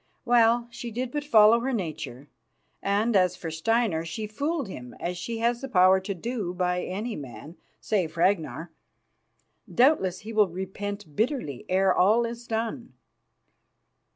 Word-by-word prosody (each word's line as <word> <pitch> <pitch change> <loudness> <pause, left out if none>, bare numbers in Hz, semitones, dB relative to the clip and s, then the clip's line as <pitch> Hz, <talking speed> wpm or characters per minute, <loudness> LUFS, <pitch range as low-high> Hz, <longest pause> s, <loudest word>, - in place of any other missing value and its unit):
Well, 235 0 +4
she 235 0 -6
did 245 +2 -4
but 295 +1 -2
follow 225 -4 +6
her 260 +3 -2
nature; 155 - -5 0.5
and 205 +3 +1
as 185 -2 +3
for 165 -2 -6
Steinar, 185 0 +1
she 215 +7 -5
fooled 280 +6 -2
him 125 -10 -9
as 180 +1 -3
she 225 +6 -4
has 235 +1 0
the 270 - -5
power 185 -3 +5
to 190 +1 -5
do 200 -2 -4
by 180 0 0
any 210 +5 -4
man, 140 +3 -9 0.2
save 175 -6 -1
Ragnar. 165 -2 0 1.0
Doubtless 240 - +3
he 225 +2 -8
will 210 -3 +4
repent 190 -1 -6
bitterly 220 - -2
ere 190 0 +3
all 220 +6 +4
is 235 +1 -7
done. 230 +2 -3
205 Hz, 150 wpm, -26 LUFS, 180-235 Hz, 1.0 s, follow